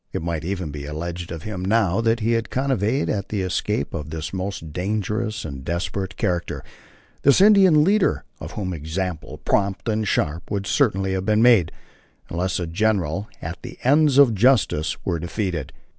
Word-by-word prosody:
It - - -3
might 85 -1 -2
even 90 -3 -3
be 70 -1 -6
alleged 85 +3 -5
of 80 -2 -6
him 100 -4 -5
now 105 0 +2
that 115 0 +1
he 115 +2 +1
had 115 -1 0
connived 130 -1 0
at 100 -2 -2
the 100 -3 -1
escape 85 -5 -1
of 75 -2 -5
this 80 +2 -5
most 95 -5 -4
dangerous 105 +4 -2
and 70 -3 -7
desperate 90 +5 -3
character, 85 -1 -2 0.6
this 140 +4 +5
Indian 190 -6 +6
leader, 200 +4 +2 0.2
of - - -8
whom 95 -3 -3
example, 80 +2 -4
prompt 100 +1 0
and 110 -1 0
sharp, 80 0 -1
would 100 -1 -2
certainly 95 -7 +1
have 95 +1 -2
been 110 +1 +3
made, 115 -10 +5 0.6
unless 90 +2 -1
the 90 - -2
general 100 0 0
and 80 +2 -4
the - - -9
ends 145 +1 +4
of 140 -5 +7
justice 105 - +2
were 85 -3 -1
defeated. 85 - -3
95 Hz, 175 wpm, -23 LUFS, 85-110 Hz, 0.6 s, of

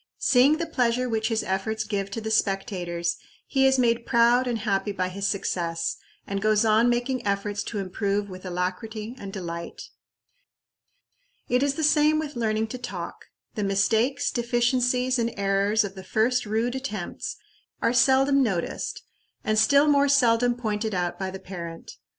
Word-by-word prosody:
Seeing 270 +4 +4
the 335 - -2
pleasure 250 -5 0
which 220 -2 0
his 225 -2 0
efforts 215 +3 -2
give 200 -2 -3
to 215 - -4
the 220 0 -4
spectators, 185 -5 -1 0.3
he 270 -1 +3
is 265 0 +3
made 235 -2 +2
proud 240 +2 +4
and 240 -2 0
happy 205 -2 -1
by 185 -2 -2
his 195 +2 -2
success, 170 -4 -2 0.3
and 200 0 -3
goes 215 +1 +3
on 220 +2 +4
making 245 +2 -1
efforts 200 0 -1
to 220 - -5
improve 200 +1 -1
with 185 -1 -10
alacrity 195 +5 -4
and 195 -1 -7
delight. 170 -3 -6 1.7
It 250 +1 +2
is 280 0 +1
the 320 - -2
same 305 0 +4
with 310 -2 -4
learning 220 -2 0
to 255 - -6
talk. 245 - -7 0.3
The 210 - -3
mistakes, 220 +8 +1
deficiencies, 245 +1 +1
and 235 0 -1
errors 200 +2 +2
of 200 -2 -5
the 190 -1 -10
first 225 +4 +1
rude 225 +3 0
attempts 260 -9 -5 0.4
are 230 - +1
seldom 265 +3 +4
noticed, 190 -9 -2 0.4
and 215 0 +2
still 280 +6 +5
more 285 -1 +4
seldom 245 -3 +3
pointed 215 -3 -2
out 175 +1 -2
by 190 -1 -2
the 190 - -6
parent. 170 -3 -8
220 Hz, 160 wpm, -25 LUFS, 195-245 Hz, 1.7 s, still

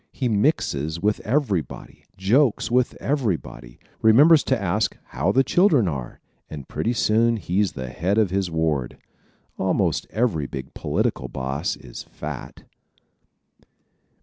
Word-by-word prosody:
He 130 - -2
mixes 95 - 0
with 105 +4 0
everybody, 110 - -2
jokes 115 +6 +2
with 125 0 +1
everybody, 90 - -3 0.2
remembers 145 +8 +6
to 130 - +1
ask 100 +2 -1
how 95 - 0
the 135 +5 +3
children 155 - +3
are 70 -7 -5 0.3
and 70 -4 -8
pretty 120 - -1
soon 115 +1 +2
he's 95 -3 0
the 65 -2 -6
head 90 - -1
of 105 -5 +2
his 95 -1 0
ward. 80 -6 -1 0.6
Almost 95 -5 0
every 100 - 0
big 65 -1 -7
political 65 - -1
boss 65 +3 -3
is - - -10
fat. - - -8
100 Hz, 125 wpm, -23 LUFS, 75-120 Hz, 0.6 s, remembers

